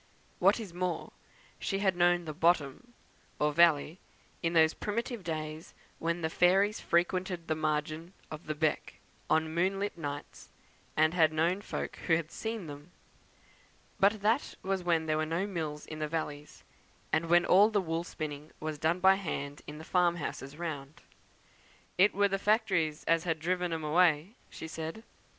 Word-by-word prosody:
What - - +4
is 205 -6 -7
more, 180 -1 -3 0.5
she 195 - -1
had 195 -2 +1
known 175 0 +3
the 155 - -5
"bottom," 165 - 0 0.4
or 150 0 +1
valley, 165 +1 +4 0.4
in 165 -1 0
those 160 -1 +5
primitive 230 0 -3
days 155 -1 -5 0.2
when 170 +1 -1
the 160 - 0
fairies 195 +5 +3
frequented 180 0 0
the 160 - +1
margin 155 +2 -2 0.2
of 155 +1 -8
the 155 - -2
"beck" 155 0 -1 0.3
on 160 0 +2
moonlight 195 +4 0
nights, 145 -2 -6 0.5
and 155 +1 +4
had 160 -3 +4
known 170 +5 +1
folk - - -5
who 165 - +5
had 160 -1 -3
seen 220 -4 -4
them. 145 +1 -10 1.1
But 200 +1 +3
that 225 +6 +1
was 190 0 -1
when 165 -2 +1
there 155 -1 +1
were 155 - 0
no 165 +4 -1
mills 160 -6 -4
in 155 - -8
the 155 - -1
valleys; 150 -2 -5 0.5
and 160 +1 +2
when 175 +1 +5
all 200 +4 +6
the 215 -2 +1
wool 165 -2 -2
spinning 150 -3 -6
was 155 -1 -4
done 165 +4 +1
by 190 +1 +6
hand 145 -6 -4
in 150 - -7
the 160 - -9
farm 175 0 +2
houses 145 -3 -6
round. 150 -3 -6 1.0
"It 195 +1 +5
wur 200 0 +4
the 195 0 -1
factories 190 -8 +1
as 165 +1 +2
had 165 -2 0
driven 180 +2 -1
'em 160 -1 -3
away," 165 +3 +3 0.2
she 160 - -8
said. 160 +6 -6
165 Hz, 170 wpm, -31 LUFS, 155-185 Hz, 1.1 s, all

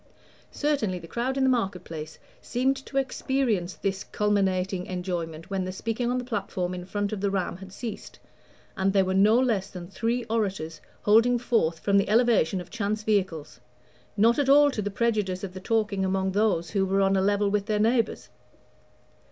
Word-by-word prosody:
Certainly 275 -11 -1
the 165 -1 -10
crowd 245 +8 -2
in 270 - +2
the 265 - +4
market 195 -7 -1
place 155 -2 -8 0.2
seemed 260 +3 0
to 275 - -4
experience 255 -8 0
this 195 -1 -2
culminating 190 -3 0
enjoyment 175 -1 -4
when 190 -1 -1
the 185 - -4
speaking 230 +5 -2
on 250 - 0
the 250 - -2
platform 195 -6 -3
in 180 -1 -6
front 205 +2 -2
of 200 - -4
the 200 - +1
Ram 185 -3 -2
had 190 0 -11
ceased, 225 +2 -7 0.6
and 195 0 +1
there 195 -1 +4
were 185 - -1
no 205 +4 +5
less 215 -7 0
than 180 -3 -8
three 230 +5 -1
orators 195 -8 -2 0.2
holding 230 +4 +5
forth 230 -9 +1
from 200 +3 +3
the 195 - 0
elevation 220 -6 +3
of 175 - -9
chance 215 -1 -2
vehicles, 185 -10 -1 0.6
not 230 +6 +4
at 280 -2 +1
all 290 +1 +7
to 215 - -3
the 205 - -2
prejudice 205 -4 -1
of 190 -2 -5
the 185 - -7
talking 210 -1 0
among 190 0 0
those 190 -5 +1
who 195 - +1
were 195 +1 +1
on 195 0 +3
a 190 - +2
level 205 +1 +2
with 205 0 0
their 215 -2 +1
neighbors. 225 +1 +1
200 Hz, 190 wpm, -26 LUFS, 185-230 Hz, 0.6 s, all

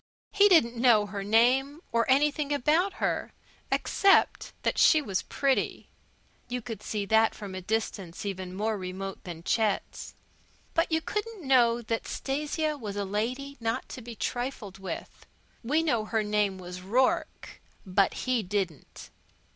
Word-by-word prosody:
He 410 0 +5
didn't 245 -10 +5
know 230 -5 +5
her 200 0 -5
name 250 +7 +3
nor 230 +1 +2
anything 290 +2 +2
about 310 +7 +2
her, - - -2 0.4
except 395 -1 +3
that - - 0
she 315 - +6
was 200 -10 -2
pretty. 275 -2 -1 0.6
You 250 0 -2
could 225 -4 -7
see 210 -1 -3
that 220 +2 +3
from 200 -3 -8
a 185 - -5
distance 205 -2 -3
even 185 -2 -5
more 215 +1 -1
remote 190 +1 -6
than 170 -2 -7
Chet's. 215 0 -1 0.6
But 330 +1 +1
you 320 0 +2
couldn't 420 -4 -4
know 240 -3 +4
that 225 0 -2
Stasia 300 +2 -2
was 210 -4 -5
a 205 -1 -2
lady 250 +8 -3
not 225 -1 -2
to 255 - -7
be 235 0 -9
trifled 240 -6 -4
with. 195 - -7 0.4
We 300 +7 +1
know 235 -9 +1
her 220 0 0
name 210 -2 0
was 180 0 -8
Rourke, 245 +8 0 0.2
but 195 +1 +1
he 255 -2 +2
didn't. 185 -6 -4
225 Hz, 150 wpm, -28 LUFS, 200-275 Hz, 0.6 s, she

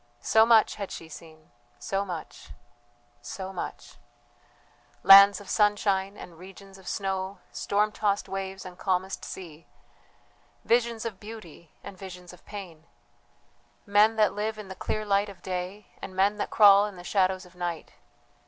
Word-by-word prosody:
So 220 0 +4
much 225 -2 +4
had 200 - -4
she 165 - -8
seen, 160 -2 -14 0.3
so 195 +12 -2
much... 175 -5 -8 0.7
so 190 +9 -7
much: 180 - -7 1.1
Lands 200 0 +9
of 205 - -13
sunshine 205 -1 +1
and 170 -2 -12
regions 195 +1 -13
of 190 - -16
snow, 190 0 -3
storm 210 +1 0
tossed 205 -1 -1
waves 195 -1 -5
and 180 0 -11
calmest 190 0 -1
sea, 165 -4 -9 1.0
visions 235 -1 +1
of 210 -5 -5
beauty 205 -7 -11
and 200 - -9
visions 180 -2 -10
of 180 - -17
pain; 175 -6 -9 1.0
men 210 +2 +4
that 215 -1 +3
live 215 +1 -3
in 210 -2 -9
the 190 - -7
clear 215 +3 -3
light 200 0 +1
of 195 -3 -14
day 185 +2 -5 0.2
and 185 - -8
men 200 +2 +2
that - - -3
crawl 205 -1 +6
in 205 - -10
the 175 - -11
shadows 185 0 0
of 180 - -18
night. 175 -2 -5
195 Hz, 155 wpm, -27 LUFS, 180-205 Hz, 1.1 s, Lands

